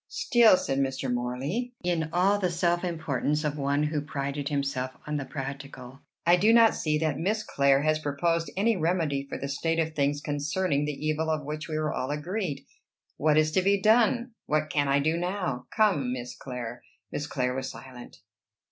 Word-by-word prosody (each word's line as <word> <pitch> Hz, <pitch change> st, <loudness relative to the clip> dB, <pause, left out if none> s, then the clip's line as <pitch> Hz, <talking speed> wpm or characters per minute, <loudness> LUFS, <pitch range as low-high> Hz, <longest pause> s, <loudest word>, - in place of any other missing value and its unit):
"Still," 240 Hz, -, +5 dB
said 135 Hz, -6 st, -1 dB
Mr. 135 Hz, -1 st, -1 dB
Morley, 135 Hz, -, -3 dB
in 170 Hz, -3 st, 0 dB
all 190 Hz, +4 st, +3 dB
the 185 Hz, -3 st, +1 dB
self 175 Hz, 0 st, +1 dB
importance 155 Hz, -3 st, -1 dB
of 150 Hz, -1 st, -1 dB
one 140 Hz, 0 st, 0 dB
who 150 Hz, 0 st, -1 dB
prided 140 Hz, 0 st, -3 dB
himself 140 Hz, -3 st, -2 dB
on 150 Hz, 0 st, -2 dB
the 140 Hz, -, -4 dB
practical, 135 Hz, -2 st, -7 dB, 0.2 s
"I 175 Hz, +1 st, +6 dB
do 210 Hz, +5 st, +4 dB
not 230 Hz, -1 st, +6 dB
see 150 Hz, -1 st, 0 dB
that 155 Hz, -3 st, -1 dB
Miss 215 Hz, +5 st, 0 dB
Clare 140 Hz, 0 st, +2 dB
has 155 Hz, 0 st, +2 dB
proposed 165 Hz, +3 st, 0 dB
any 225 Hz, +3 st, +3 dB
remedy 160 Hz, -5 st, 0 dB
for -, -, -4 dB
the 140 Hz, -, -4 dB
state 165 Hz, +4 st, -1 dB
of 160 Hz, -1 st, 0 dB
things 145 Hz, -1 st, +1 dB
concerning 145 Hz, +1 st, -1 dB
the 150 Hz, 0 st, -4 dB
evil 155 Hz, +1 st, 0 dB
of 155 Hz, -2 st, -1 dB
which 150 Hz, +2 st, -5 dB
we 155 Hz, -, -4 dB
are 155 Hz, -1 st, -1 dB
all 130 Hz, -, -3 dB
agreed. 150 Hz, -1 st, -3 dB, 0.5 s
What 155 Hz, 0 st, +3 dB
is 155 Hz, 0 st, +3 dB
to 185 Hz, -, +2 dB
be 200 Hz, +1 st, +3 dB
done? 235 Hz, +4 st, +3 dB, 0.2 s
What 155 Hz, 0 st, 0 dB
can 145 Hz, -1 st, +1 dB
I 140 Hz, 0 st, +3 dB
do 155 Hz, +4 st, +1 dB
now? 175 Hz, -8 st, -3 dB
Come, 190 Hz, -, +2 dB
Miss 125 Hz, -1 st, -6 dB
Clare." 120 Hz, -2 st, -6 dB, 0.3 s
Miss 145 Hz, -, -3 dB
Clare 125 Hz, -3 st, -1 dB
was 130 Hz, 0 st, -3 dB
silent. 125 Hz, +1 st, -11 dB
150 Hz, 190 wpm, -27 LUFS, 140-175 Hz, 0.5 s, I